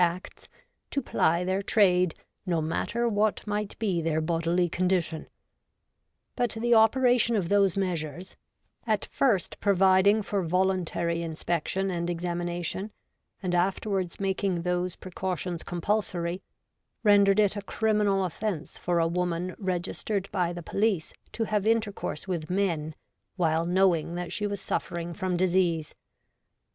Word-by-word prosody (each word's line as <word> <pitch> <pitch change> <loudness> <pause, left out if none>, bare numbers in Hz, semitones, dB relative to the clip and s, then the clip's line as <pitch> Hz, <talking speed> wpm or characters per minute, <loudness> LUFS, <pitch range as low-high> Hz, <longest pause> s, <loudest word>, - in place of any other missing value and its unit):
Acts, 175 +1 -3 0.4
to - - -1
ply 170 -9 +1
their 185 +2 0
trade 185 -4 +3 0.3
no 170 -2 +1
matter 230 +9 -1
what 210 -1 +1
might 210 -1 -3
be 195 -6 0
their 160 -1 0
bodily 170 +2 +1
condition; 175 -2 -1 1.1
but 240 -3 -1
the 240 +1 +2
operation 235 +1 +4
of 185 -5 0
those 200 -2 +3
measures, 175 -1 -3 0.5
at 215 -2 +1
first 220 -10 0
providing 195 +2 +4
for 200 0 -1
voluntary 175 -1 0
inspection 170 +3 -2
and 170 -1 -2
exami 175 0 -2
nation, 175 +4 -3 0.5
and 180 -1 -1
afterwards 185 0 0
making 190 -2 -1
those 180 0 -1
precautions 180 -2 -4
compulsory, 175 -1 -2 0.6
rendered 200 -1 +5
it 205 -1 +3
a 205 - -3
criminal 205 -1 +1
offence 185 -1 -4
for 175 -1 0
a 165 - +3
woman 180 +1 -2
registered 190 +1 -2
by 180 -3 0
the 175 0 -7
police 200 -3 0 0.2
to 230 - -2
have 210 -1 0
intercourse 220 -7 -1
with 170 -4 -3
men 170 -5 -1 0.4
while 165 -2 +1
knowing 175 -2 +2
that 175 0 -4
she 210 - -1
was 200 -1 -3
suffering 170 0 -3
from 185 -1 -2
disease. 175 -3 +1
185 Hz, 130 wpm, -27 LUFS, 170-205 Hz, 1.1 s, rendered